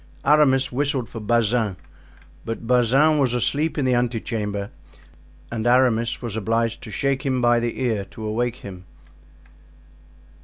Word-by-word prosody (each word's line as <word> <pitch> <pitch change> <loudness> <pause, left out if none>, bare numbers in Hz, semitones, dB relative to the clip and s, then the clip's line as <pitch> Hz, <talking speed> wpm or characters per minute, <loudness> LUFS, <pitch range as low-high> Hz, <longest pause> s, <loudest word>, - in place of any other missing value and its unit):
Aramis 135 -3 +4
whistled 135 -2 -1
for 115 - -7
Bazin, 110 -2 +1 0.7
but 115 0 -5
Bazin 130 +6 +3
was 125 -3 +1
asleep 150 +7 0
in 145 - 0
the 130 - +2
ante 120 -1 0
chamber, 105 -3 -4 0.8
and 115 0 -2
Aramis 120 -1 +2
was 115 -3 -4
obliged 115 +1 -1
to - - -9
shake 135 +4 -1
him 130 -3 0
by 120 -1 +3
the 120 0 -3
ear 110 -6 -1
to 110 +3 -9
awake 120 +3 -1
him. 95 -6 -10
120 Hz, 145 wpm, -22 LUFS, 110-130 Hz, 0.8 s, Aramis